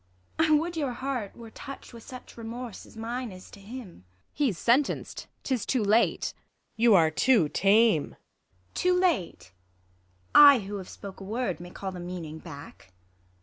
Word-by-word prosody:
I 320 - +5
Avould 320 +3 +2
your 280 -5 -1
heart 250 -5 -4
were 230 -1 -11
toucht 275 +1 -10
with 230 - -10
such 255 +2 -11
Eemorse, 235 -1 -7
as - - -16
mine 235 +1 -4
is 185 0 -12
to - - -13
him. 230 +4 -8
Ang. 170 - -17 0.3
He's 265 - 0
sentenc'd; 255 +8 0 0.2
'tis 255 -6 -1
too 250 0 0
late! 215 +3 +2
Luc. - - -37 0.3
You 230 -1 +5
are 160 -3 +5
too 195 - +3
tame. 200 -4 +3
IsAB. 90 0 -40
Too 360 0 +2
late? 320 - 0 0.8
I 285 -2 +10
who 200 +1 -5
have 190 -2 -8
spoke 195 -1 -10
a - - -6
Avord 210 -4 -2
may 175 0 -9
call 190 +1 -6
The 180 - -8
meaning 175 -3 -6
back. 140 - -12
220 Hz, 175 wpm, -27 LUFS, 180-255 Hz, 0.8 s, I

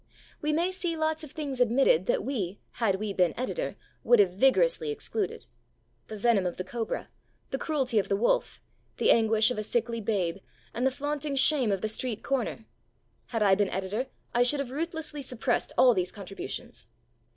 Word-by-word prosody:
We 300 - 0
may 340 +4 +1
see 355 -3 -2
lots 315 0 0
of 305 - -8
things 280 -5 -4
admitted 270 - +3
that - - +1
we, 205 -8 -3
had 220 -5 +1
we 205 +1 -3
been 180 -3 +2
editor, 255 - -3 0.3
would 240 - +5
have 200 -4 +4
vigorously 445 - +3
excluded. 435 -1 -2 0.6
The 215 - -7
venom 205 -3 +2
of 175 - -5
the 185 - -3
cobra, 225 +4 -4 0.4
the 270 - -2
cruelty 265 -8 +1
of 195 - -2
the 200 - +2
wolf, 220 +4 +1 0.4
the - - +4
anguish 220 0 +4
of 245 - -2
a - - -2
sickly 230 +1 -1
babe, 195 -5 -1 0.4
and 250 +3 +1
the - - +4
flaunting 290 +1 -3
shame 270 -4 +3
of 195 -2 -1
the - - 0
street 225 0 -4
corner; 245 -4 -2 0.6
had 225 -3 0
I 195 -2 +5
been 200 0 +2
editor 195 +7 -2 0.3
I 240 - +3
should 250 +4 +3
have 270 -3 -3
ruthlessly 315 0 -4
suppressed 250 -1 -1
all 250 -1 +7
these 185 -3 -1
contributions. 195 -1 -7
245 Hz, 185 wpm, -28 LUFS, 210-295 Hz, 0.6 s, all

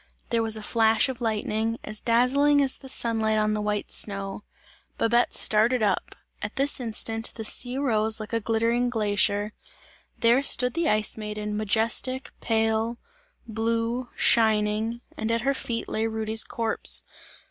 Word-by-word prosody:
There 230 -1 +1
was 220 -1 +1
a 215 - -8
flash 225 +2 +2
of 255 -2 -7
lightning, 220 0 -2
as 215 0 -3
dazzling 270 +5 +2
as 265 - +2
the 265 - -10
sunlight 220 -3 0
on 215 0 +1
the 210 - -2
white 210 0 -3
snow. 200 0 +1 0.5
Babette 235 +1 +2
started 220 +3 +3
up; 200 -3 -1 0.3
at 210 - -5
this 275 +1 0
instant, 225 -1 -2
the 225 - -6
sea 245 +3 +2
rose 220 -5 +1
like 215 +1 -8
a 230 - +1
glittering 230 +2 0
glacier; 205 -2 +1 0.6
there 235 +3 +3
stood 250 -2 +4
the 335 -1 0
Ice 215 +1 +1
Maiden 210 -1 -5
majestic, 225 +5 0
pale, 225 +1 0 0.5
blue, 230 +2 -2
shining, 220 +1 +2 0.2
and 220 - -3
at 230 0 0
her 275 +3 0
feet 235 -3 -4
lay 220 +1 -2
Rudy's 220 0 +1
corpse. 225 -1 +1
225 Hz, 150 wpm, -25 LUFS, 215-235 Hz, 0.6 s, stood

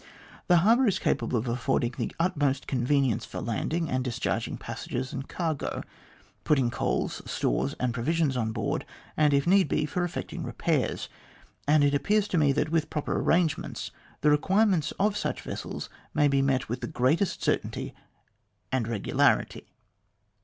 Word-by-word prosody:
The 180 - +6
harbour 235 +4 +5
is 190 -3 +2
capable 125 - 0
of 115 +3 -2
affording 120 0 0
the - - -3
utmost 145 -6 +1
convenience 130 -2 +1
for - - -6
landing 160 +8 -1
and 130 -2 -1
discharging 125 -2 -2
passengers 130 +1 -5
and 135 0 -5
cargo, 160 -5 -2 0.6
putting 130 -5 +2
coals, - - -1
stores, 60 +3 0
and 125 -2 0
provisions 145 +3 0
on 110 -3 0
board, - - -2 0.3
and, 150 -1 +4
if 140 -1 +2
need 190 +2 +4
be, 155 - 0
for 175 +4 -2
effecting 175 - -4
repairs; - - -1 0.6
and 150 0 +5
it 145 0 +3
appears 210 +8 +2
to 175 - +1
me 145 -2 +4
that, 140 - 0
with 160 -1 0
proper 150 - -2
arrangements, 165 -4 0 0.3
the 150 - +4
requirements 185 +1 +3
of 205 +1 +1
such - - -2
vessels - - -5 0.3
may 150 -1 +4
be 140 -1 +3
met 135 -2 +1
with 120 +3 -4
the - - -3
greatest 155 +10 +1
certainty - - -1 0.8
and 130 -4 0
regularity." 120 +3 +1
145 Hz, 155 wpm, -28 LUFS, 125-165 Hz, 0.8 s, The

